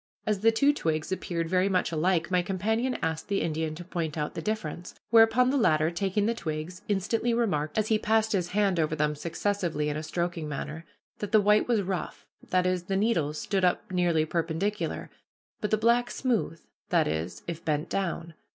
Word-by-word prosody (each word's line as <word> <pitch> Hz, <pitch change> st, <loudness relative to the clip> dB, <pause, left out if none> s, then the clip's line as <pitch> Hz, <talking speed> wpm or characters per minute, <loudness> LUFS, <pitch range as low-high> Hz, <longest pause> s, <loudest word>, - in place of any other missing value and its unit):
As 210 Hz, -2 st, 0 dB
the 225 Hz, +3 st, +5 dB
two 280 Hz, +6 st, +3 dB
twigs 160 Hz, -, -2 dB
appeared 170 Hz, -3 st, -2 dB
very 185 Hz, +3 st, +2 dB
much 185 Hz, -2 st, +1 dB
alike, 170 Hz, +2 st, +1 dB
my 180 Hz, -1 st, +3 dB
companion 220 Hz, +8 st, -1 dB
asked 160 Hz, -1 st, -2 dB
the 200 Hz, -1 st, 0 dB
Indian 160 Hz, -1 st, -2 dB
to 175 Hz, -, -8 dB
point 165 Hz, -3 st, -3 dB
out 150 Hz, -1 st, -2 dB
the -, -, -4 dB
difference; 185 Hz, -5 st, -4 dB, 0.2 s
whereupon 230 Hz, +2 st, +6 dB
the 285 Hz, -, +1 dB
latter, 155 Hz, -, +3 dB
taking 195 Hz, +3 st, 0 dB
the 230 Hz, -, +2 dB
twigs, 165 Hz, -2 st, -5 dB
instantly 220 Hz, +4 st, +1 dB
remarked, 155 Hz, -10 st, 0 dB
as 215 Hz, 0 st, +1 dB
he 220 Hz, -1 st, +3 dB
passed 220 Hz, 0 st, +2 dB
his 185 Hz, -5 st, +1 dB
hand 195 Hz, -2 st, +1 dB
over 155 Hz, -1 st, +1 dB
them 150 Hz, 0 st, +1 dB
successively 165 Hz, 0 st, -1 dB
in 150 Hz, -, -2 dB
a -, -, -3 dB
stroking 170 Hz, 0 st, -3 dB
manner, 155 Hz, +3 st, -5 dB, 0.3 s
that 205 Hz, -2 st, -4 dB
the 215 Hz, -, +6 dB
white 210 Hz, +1 st, +4 dB
was 230 Hz, -4 st, +2 dB
rough, 185 Hz, -1 st, -4 dB, 0.2 s
that 185 Hz, 0 st, +2 dB
is, 185 Hz, -1 st, 0 dB
the 195 Hz, +1 st, -1 dB
needles 165 Hz, -9 st, +1 dB
stood 195 Hz, -2 st, -1 dB
up 185 Hz, +4 st, +1 dB
nearly 175 Hz, -3 st, +2 dB
perpendicular, 170 Hz, +6 st, -2 dB, 0.5 s
but 210 Hz, -, -2 dB
the 215 Hz, -, +3 dB
black 235 Hz, +2 st, +3 dB
smooth, 235 Hz, -10 st, -1 dB, 0.3 s
that -, -, +3 dB
is, 80 Hz, +3 st, -3 dB
as 170 Hz, -1 st, -5 dB
if -, -, -30 dB
bent 155 Hz, +1 st, 0 dB
down. 170 Hz, -3 st, -3 dB
180 Hz, 195 wpm, -28 LUFS, 160-210 Hz, 0.5 s, whereupon